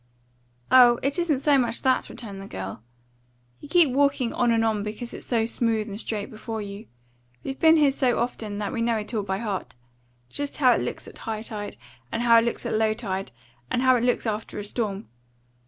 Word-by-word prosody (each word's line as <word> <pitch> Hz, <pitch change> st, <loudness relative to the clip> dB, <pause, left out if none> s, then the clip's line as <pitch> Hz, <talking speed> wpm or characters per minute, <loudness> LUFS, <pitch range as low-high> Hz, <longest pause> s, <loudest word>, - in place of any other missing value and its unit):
"Oh, 245 Hz, -2 st, +8 dB
it 280 Hz, +5 st, 0 dB
isn't 335 Hz, -5 st, +1 dB
so 285 Hz, -2 st, +4 dB
much 235 Hz, -2 st, 0 dB
that," 260 Hz, -1 st, +2 dB
returned 200 Hz, -5 st, -8 dB
the 195 Hz, -, -9 dB
girl. 95 Hz, -, -6 dB, 0.8 s
"You -, -, -12 dB
keep 335 Hz, -4 st, +5 dB
walking 275 Hz, -3 st, +2 dB
on 245 Hz, -, +2 dB
and 225 Hz, -1 st, +2 dB
on 215 Hz, -2 st, +1 dB
because 215 Hz, +3 st, -5 dB
it's -, -, -9 dB
so 230 Hz, -3 st, +1 dB
smooth 225 Hz, -2 st, 0 dB
and 205 Hz, 0 st, -6 dB
straight 210 Hz, -3 st, -4 dB
before 220 Hz, +1 st, -6 dB
you. 205 Hz, +1 st, -7 dB, 0.6 s
We've 270 Hz, 0 st, -5 dB
been 320 Hz, 0 st, +6 dB
here 295 Hz, -3 st, +4 dB
so 260 Hz, -3 st, +1 dB
often 225 Hz, -3 st, -3 dB
that 205 Hz, +2 st, -3 dB
we 230 Hz, -, -2 dB
know 230 Hz, -1 st, +1 dB
it 215 Hz, +2 st, -5 dB
all 215 Hz, -, 0 dB
by 190 Hz, -1 st, -2 dB
heart 205 Hz, -, -4 dB, 0.5 s
just 285 Hz, -, -5 dB
how 255 Hz, -4 st, +5 dB
it -, -, +2 dB
looks -, -, -5 dB
at -, -, -11 dB
high 220 Hz, -2 st, -4 dB
tide, 210 Hz, -3 st, -6 dB, 0.3 s
and 235 Hz, -, -1 dB
how 230 Hz, -1 st, +7 dB
it 230 Hz, -, 0 dB
looks 235 Hz, -, -2 dB
at -, -, -1 dB
low 215 Hz, 0 st, +2 dB
tide, 195 Hz, -4 st, -4 dB, 0.4 s
and 245 Hz, -, 0 dB
how 255 Hz, -1 st, +6 dB
it 240 Hz, -, 0 dB
looks 245 Hz, 0 st, +1 dB
after 215 Hz, -1 st, -3 dB
a 205 Hz, -, -4 dB
storm. 205 Hz, -1 st, -3 dB
230 Hz, 215 wpm, -25 LUFS, 210-255 Hz, 0.8 s, Oh